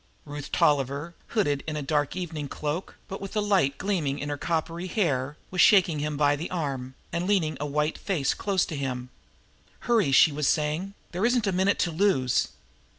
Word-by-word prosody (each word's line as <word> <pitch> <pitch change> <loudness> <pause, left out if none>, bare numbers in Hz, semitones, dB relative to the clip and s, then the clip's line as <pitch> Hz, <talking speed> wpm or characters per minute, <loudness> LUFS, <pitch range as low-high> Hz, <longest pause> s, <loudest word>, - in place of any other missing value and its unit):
Ruth 145 -1 -7
Tolliver, 145 +3 +1
hooded 145 -11 0
in 155 - -2
an 145 - -4 0.3
evening 160 -5 -4
cloak, 150 +6 -4
but 195 - -6
with 195 - -6
the 215 - +1
light 190 -10 +2
gleaming 170 -9 -1
in 145 0 -4
her 145 - -1
coppery 165 +3 -2
hair, 145 - 0
was 185 - +2
shaking 180 -7 +5
him 150 0 -2
by 145 0 +3
the 160 +5 -5
arm 135 -7 -3 0.2
and 175 +2 -1
leaning 170 -7 +2
a 150 - -2
white 150 +2 -1
face 170 -9 0
close 195 -3 0
to 160 - -6
him. 125 -2 -4 0.7
"Hurry!" 225 - +2
she 145 +3 +6
was 145 -1 -1
saying. 155 +6 0 0.2
"There 180 +3 -3
isn't 240 -1 +3
a 195 - +1
minute 190 +2 +2
to 175 - -3
lose. 160 -8 +2
155 Hz, 185 wpm, -27 LUFS, 145-185 Hz, 0.7 s, she